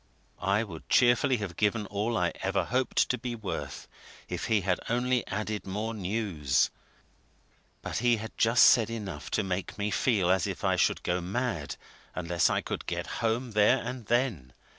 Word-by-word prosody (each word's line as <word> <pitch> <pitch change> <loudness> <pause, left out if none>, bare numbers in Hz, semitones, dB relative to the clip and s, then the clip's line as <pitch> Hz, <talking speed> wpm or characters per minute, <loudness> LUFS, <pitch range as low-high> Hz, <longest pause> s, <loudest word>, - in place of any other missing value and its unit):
I 100 +4 +2
would 85 -8 -10
cheerfully 125 +1 +4
have 100 -5 -5
given 105 +2 +1
all 105 +4 -1
I 90 -1 +1
ever 95 +1 0
hoped 130 +2 +1
to 125 - 0
be 120 0 -4
worth 110 -4 -5 0.4
if - - -4
he 110 -2 +2
had 90 -1 0
only 125 +1 +1
added 105 +1 -3
more 105 +4 -3
news; 90 - 0 1.1
but - - -3
he 120 0 +3
had 110 +1 -7
just 115 +2 +5
said 115 -4 +6
enough 105 -5 -6
to - - 0
make 95 0 -3
me 105 0 -1
feel 100 -6 +2
as 95 -3 +2
if - - -5
I - - +2
should - - +1
go 90 +1 0
mad 95 - -2 0.4
unless 85 -1 +1
I - - +1
could - - -5
get - - -2 0.2
home 115 +2 0
there 105 +4 +4
and 125 -2 -6
then. 115 - 0
105 Hz, 175 wpm, -29 LUFS, 95-120 Hz, 1.1 s, said